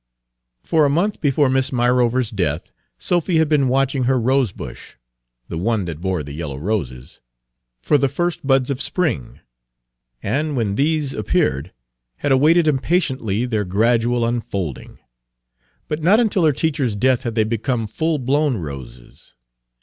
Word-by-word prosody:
For 160 -2 +2
a 145 - +4
month 180 +9 0
before 145 -1 +2
Miss 130 +1 +1
Myrover's 125 -1 +1
death 85 -6 -2 0.3
Sophy 175 -1 0
had 160 -1 +3
been 145 -3 +2
watching 135 0 +1
her 130 0 +2
rosebush 130 -2 -2 0.5
the 80 - -5
one 105 0 0
that 80 -2 -6
bore 90 -4 -1
the 70 0 -8
yellow 75 -3 -5
roses 70 - -4 0.7
or 145 - +4
the 140 0 +2
first 175 +1 -2
buds 135 -1 +3
of 135 0 -2
spring, 150 - -2 0.8
and, 145 +6 -1
when 110 -4 0
these 145 +2 0
appeared, 95 - 0 0.4
had 145 - -2
awaited 155 +5 +4
impatiently 130 - 0
their 110 -4 -1
gradual 115 +5 +1
unfolding. 100 - -4 0.9
But 150 +1 -3
not 190 +8 +5
until 205 -7 +2
her 155 - +5
teacher's 140 -6 -1
death 130 +4 +2
had 120 -4 -4
they 110 - +3
become 115 +2 -1
full 155 +9 -1
blown 140 0 +1
roses. 65 -9 -10
130 Hz, 145 wpm, -20 LUFS, 105-150 Hz, 0.9 s, not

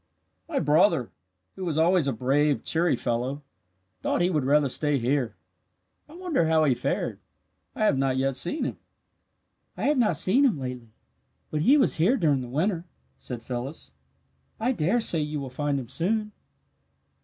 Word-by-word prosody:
"My 305 - -2
brother, 150 - +3 0.4
who 190 - -7
was 165 -4 -2
always 170 -1 +3
a - - +1
brave, 135 +5 +1
cheery 170 +1 +1
fellow, 125 +4 -2 0.6
thought - - 0
he 180 +1 +2
would 150 -6 0
rather 145 +1 +3
stay 145 +2 0
here. 125 -1 -1 0.7
I 310 - -13
wonder 345 - 0
how 160 -1 +3
he 140 -4 +3
fared. - - -2 0.6
I - - 0
have 135 -10 +2
not 135 -1 +1
yet 135 0 0
seen 175 - +1
him." - - -4 1.0
"I - - -4
have 290 -2 +2
not 220 -4 +2
seen 245 +10 +3
him 250 - +3
lately, 125 -3 -6 0.6
but 150 - -1
he 265 - +5
was 270 - +3
here 195 +12 +3
during 150 - +2
the 125 - -6
winter," 165 - -1 0.3
said 120 -2 -6
Phyllis. 125 +5 -6 0.7
"I 235 +4 +1
dare 220 +2 +1
say 170 -6 +2
you 150 0 -3
will 135 -2 -6
find 145 +1 -1
him 125 - -7
soon." 210 - -1
150 Hz, 170 wpm, -26 LUFS, 135-190 Hz, 1.0 s, he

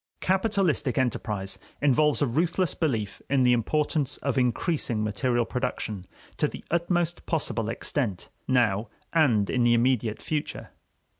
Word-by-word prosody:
Capitalistic 190 - +1
enterprise 105 -6 -1 0.2
involves 145 +1 +3
a - - +4
ruthless 165 +7 0
belief 115 - -2
in 135 -1 +3
the 125 0 +5
importance 145 +4 0
of 140 -3 -2
increasing 125 -2 0
material 120 +3 0
production 110 -7 -3 0.3
to - - +2
the - - -9
utmost 170 0 0
possible 115 -9 -1
extent 115 -4 -2 0.2
now 115 -4 +2 0.3
and 120 -11 +3
in 125 - 0
the 120 0 +5
immediate 120 -3 +1
future. 150 -2 -4
130 Hz, 130 wpm, -26 LUFS, 115-155 Hz, 0.3 s, the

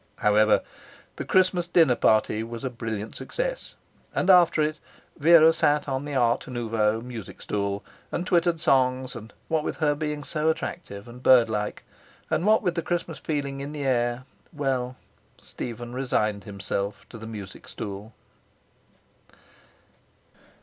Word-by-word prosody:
However, 105 +1 +4 0.5
the - - -4
Christmas 185 -2 +2
dinner 165 -6 +5
party 110 -2 +2
was 115 +2 -6
a 130 - -2
brilliant 110 -3 -5
success, - - -4 0.4
and 190 - +4
after 175 -3 +5
it 155 0 -1 0.4
Vera 165 +1 +7
sat 150 -2 +2
on 135 0 -2
the 145 -1 -4
art 120 -2 +2
nouveau 115 -3 0
music 115 -5 -8
stool 100 -1 -2 0.3
and 175 - -2
twittered 170 -2 +2
songs, 130 -3 +2
and 110 -1 -9 0.2
what 160 -2 0
with - - -3
her 150 -2 +2
being 150 0 -3
so 155 0 0
attractive 160 - -4
and 120 +1 -11
birdlike, 115 -5 +3 0.5
and 180 - +1
what 220 +1 +4
with 180 -3 +1
the 170 - -1
Christmas 170 -1 -3
feeling 140 -3 -3
in 145 +2 -6
the 145 -2 -4
air... 120 -1 +1 0.3
well, 130 -4 -2 0.4
Stephen 120 0 -7
resigned 110 -6 -1
himself 100 0 -4
to 115 - -10
the 110 - -8
music 105 -3 -9
stool. 100 +1 -7
130 Hz, 145 wpm, -26 LUFS, 110-155 Hz, 0.5 s, Vera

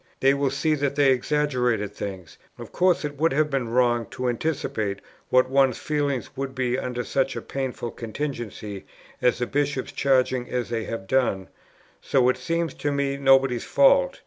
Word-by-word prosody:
They 135 +1 +4
will 140 -1 +1
see 140 +4 0
that 140 -2 -1
they 140 -2 +4
exaggerated 125 -6 0
things.... 95 -6 -7 0.2
Of - - -10
course 180 -3 +2
it 145 -1 -5
would 160 +1 +2
have 150 +1 +1
been 130 -4 -1
wrong 120 -2 +2
to 125 0 -2
anticipate 115 -6 -2 0.3
what 130 0 +4
one's 135 0 +3
feelings 145 -4 -2
would 135 0 -4
be 125 -1 0
under 125 -1 -3
such 135 +1 0
a - - -2
painful 130 -3 -4
contingency 115 -4 -6 0.4
as 125 - +3
the 125 - -1
Bishops' 140 0 -1
charging 130 -2 +1
as 125 -2 -2
they 115 -2 -2
have 115 -4 -5
done, 100 -6 0 0.5
so 125 -2 +2
it 125 - +1
seems 165 +4 -2
to 145 - -2
me 140 -1 0
nobody's 135 -3 +3
fault. - - +3
130 Hz, 170 wpm, -24 LUFS, 120-140 Hz, 0.5 s, They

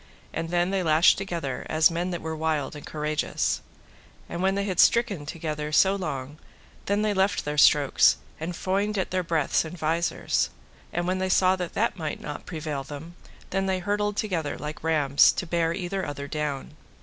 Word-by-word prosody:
And 165 0 -3
then 175 +1 +1
they 195 -1 +1
lashed 160 +1 +5
together 170 -9 -4
as 160 +1 +4
men 175 +2 -2
that 175 -2 -4
were 160 0 -3
wild 155 -3 -1
and 150 - -9
courageous. 150 0 -1 0.7
And 170 - -5
when 190 +1 +2
they 200 - 0
had 190 -3 -3
stricken 235 -6 +4
so - - -2
together 155 -2 -4
long, 155 -7 -3 0.5
then 205 +1 +1
they 210 -1 +1
left 195 +1 +1
their 150 0 -1
strokes, 145 -1 +5 0.2
and 165 +3 -4
foined 200 +4 -1
at 190 - -1
their 185 0 +1
breaths 165 -4 +1
and 165 +2 -8
visors; 165 +2 0 0.4
and 175 0 -1
when 185 +1 0
they 190 0 -1
saw 185 0 +4
that 180 -2 -5
that 215 -3 0
might 155 -2 -3
not 145 0 -7
prevail 155 -4 -4
them, 145 +5 -9 0.4
then 195 +1 0
they 190 -1 +1
hurtled 205 +2 -1
together 165 -9 -2
like 150 +1 -7
rams 150 -4 +4
to - - -3
bear 165 -1 0
either 190 +2 -3
other 140 -1 -5
down. 150 -2 -3
165 Hz, 185 wpm, -26 LUFS, 150-190 Hz, 0.7 s, lashed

